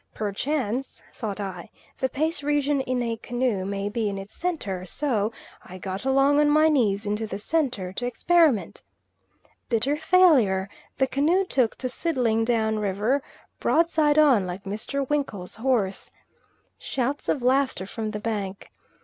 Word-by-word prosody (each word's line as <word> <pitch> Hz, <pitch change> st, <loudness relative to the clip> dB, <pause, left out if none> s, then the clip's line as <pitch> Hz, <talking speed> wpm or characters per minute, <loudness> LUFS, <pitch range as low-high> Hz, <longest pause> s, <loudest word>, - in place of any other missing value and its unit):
Perchance, 250 Hz, +4 st, -2 dB
thought 210 Hz, -3 st, -5 dB
I, 190 Hz, -4 st, -6 dB, 0.3 s
the 260 Hz, -, 0 dB
pace 310 Hz, +2 st, -1 dB
region 290 Hz, -1 st, +1 dB
in 255 Hz, -1 st, -1 dB
a 230 Hz, -1 st, -2 dB
canoe 240 Hz, -4 st, -1 dB
may 200 Hz, 0 st, -2 dB
be 215 Hz, 0 st, -1 dB
in 200 Hz, -, -4 dB
its 195 Hz, +2 st, -8 dB
centre; 225 Hz, -, -3 dB
so 220 Hz, -, -1 dB, 0.3 s
I 185 Hz, -, -10 dB
got 190 Hz, +4 st, -5 dB
along 275 Hz, +2 st, +4 dB
on 295 Hz, 0 st, +4 dB
my 310 Hz, +1 st, +5 dB
knees 215 Hz, -8 st, +2 dB
into 210 Hz, +2 st, -2 dB
the 195 Hz, -, -4 dB
centre 230 Hz, -, -1 dB
to 245 Hz, +5 st, -3 dB
experiment. 305 Hz, -, +2 dB, 0.9 s
Bitter 240 Hz, +5 st, +2 dB
failure; 295 Hz, -, +4 dB, 0.3 s
the 265 Hz, -, +3 dB
canoe 315 Hz, +9 st, +2 dB
took 255 Hz, -10 st, +1 dB
to 255 Hz, -, -3 dB
sidling 250 Hz, -6 st, 0 dB
down 220 Hz, -2 st, +1 dB
river 210 Hz, +7 st, 0 dB, 0.4 s
broadside 315 Hz, -2 st, +2 dB
on, 265 Hz, -11 st, +5 dB
like 180 Hz, +2 st, -6 dB
Mr. 220 Hz, +7 st, -3 dB
Winkle's 250 Hz, -12 st, -3 dB
horse. 225 Hz, -6 st, 0 dB, 0.7 s
Shouts 270 Hz, +3 st, -2 dB
of 265 Hz, -, 0 dB
laughter 260 Hz, -6 st, +2 dB
from 220 Hz, +2 st, -4 dB
the 210 Hz, 0 st, -4 dB
bank. 205 Hz, -3 st, -4 dB
240 Hz, 150 wpm, -25 LUFS, 205-285 Hz, 0.9 s, my